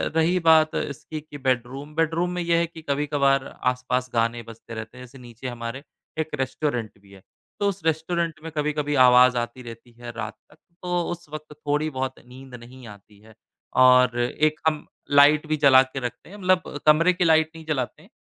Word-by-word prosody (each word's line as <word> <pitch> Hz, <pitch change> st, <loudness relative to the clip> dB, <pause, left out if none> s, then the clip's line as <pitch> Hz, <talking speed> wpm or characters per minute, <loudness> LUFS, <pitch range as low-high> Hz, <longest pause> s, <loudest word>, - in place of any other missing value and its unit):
रही 165 Hz, +3 st, +2 dB
बात 160 Hz, -1 st, +4 dB
इसकी 150 Hz, +2 st, -5 dB
कि 150 Hz, -1 st, -11 dB
बेडरूम, 130 Hz, +2 st, -2 dB
बेडरूम 165 Hz, +2 st, 0 dB
में 180 Hz, -, -3 dB
ये 170 Hz, -1 st, +1 dB
है 170 Hz, -, +2 dB
कि 165 Hz, -1 st, -12 dB
कभी-कभार 140 Hz, -2 st, +1 dB, 0.3 s
आसपास 125 Hz, 0 st, -3 dB
गाने 115 Hz, 0 st, 0 dB
बजते 115 Hz, 0 st, -12 dB
रहते 110 Hz, +2 st, -8 dB
हैं 125 Hz, -, -10 dB
जैसे 125 Hz, +2 st, -16 dB
नीचे 120 Hz, 0 st, -10 dB
हमारे 120 Hz, +2 st, -6 dB, 0.4 s
एक 160 Hz, -, -1 dB
रेस्टोरेंट 130 Hz, -4 st, -3 dB
भी 100 Hz, 0 st, -21 dB
है, 100 Hz, -1 st, -15 dB, 0.4 s
तो 205 Hz, -, +1 dB
उस 195 Hz, -2 st, -6 dB
रेस्टोरेंट 165 Hz, +1 st, -1 dB
में 165 Hz, -, -7 dB
कभी-कभी 150 Hz, 0 st, -1 dB
आवाज़ 125 Hz, 0 st, +6 dB
आती 120 Hz, +2 st, -4 dB
रहती 115 Hz, +1 st, -11 dB
है 120 Hz, 0 st, -7 dB
रात 110 Hz, -2 st, -5 dB, 0.2 s
तक। -, -, -20 dB, 0.3 s
तो 175 Hz, -1 st, 0 dB
उस 175 Hz, -2 st, -8 dB
वक़्त 155 Hz, 0 st, -9 dB
थोड़ी-बहुत 145 Hz, -3 st, -2 dB
नींद 130 Hz, +1 st, -12 dB
नहीं 125 Hz, +1 st, -13 dB
आती 100 Hz, 0 st, -15 dB
है 110 Hz, +1 st, -19 dB, 0.5 s
और 125 Hz, -1 st, +5 dB
एक 155 Hz, +5 st, 0 dB
हम 155 Hz, -1 st, 0 dB, 0.3 s
लाइट 145 Hz, +2 st, +5 dB
भी 155 Hz, 0 st, 0 dB
जला 135 Hz, -3 st, +7 dB
के 130 Hz, +1 st, -7 dB
रखते 125 Hz, +4 st, -7 dB
हैं 205 Hz, -, -11 dB
मतलब 185 Hz, -6 st, 0 dB
कमरे 165 Hz, +4 st, +5 dB
की 180 Hz, -, 0 dB
लाइट 160 Hz, -1 st, +4 dB
नहीं 160 Hz, -1 st, -11 dB
जलाते 145 Hz, -2 st, -3 dB
हैं, 185 Hz, -, -20 dB
140 Hz, 190 wpm, -24 LUFS, 125-160 Hz, 0.5 s, जला